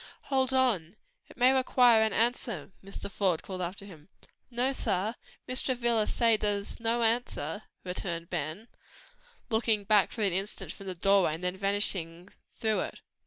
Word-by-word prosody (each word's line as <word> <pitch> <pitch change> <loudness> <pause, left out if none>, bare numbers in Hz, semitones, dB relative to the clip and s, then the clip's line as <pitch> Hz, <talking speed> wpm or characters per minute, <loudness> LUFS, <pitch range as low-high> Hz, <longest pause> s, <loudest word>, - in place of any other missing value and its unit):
"Hold 265 -1 +3
on! 220 -10 +1 0.3
It - - -15
may 255 +1 +5
require 250 -3 +5
an 220 0 +2
answer," 230 - 0
Mr. 195 +1 -7
Faude 190 -4 0
called 185 -1 -6
after 185 +3 -5
him. 165 -4 -14 0.4
"No, 250 +2 0
sah; 200 -3 -1 0.3
Mrs. 255 0 -2
Travilla 240 -4 +1
say 230 -2 +3
dere's 205 -1 -2
no 230 +1 +1
answer," 225 -6 0 0.2
returned 175 -2 -4
Ben, 170 +6 -4 0.8
looking 220 -2 +1
back 205 -1 +4
for 220 - -3
an 195 -3 +2
instant 195 +3 -3
from 195 - -11
the 185 - -4
doorway, 190 -3 +3
then 180 +2 -2
vanishing 190 -3 -1 0.3
through 220 -1 0
it. - - -5
205 Hz, 155 wpm, -29 LUFS, 185-235 Hz, 0.8 s, may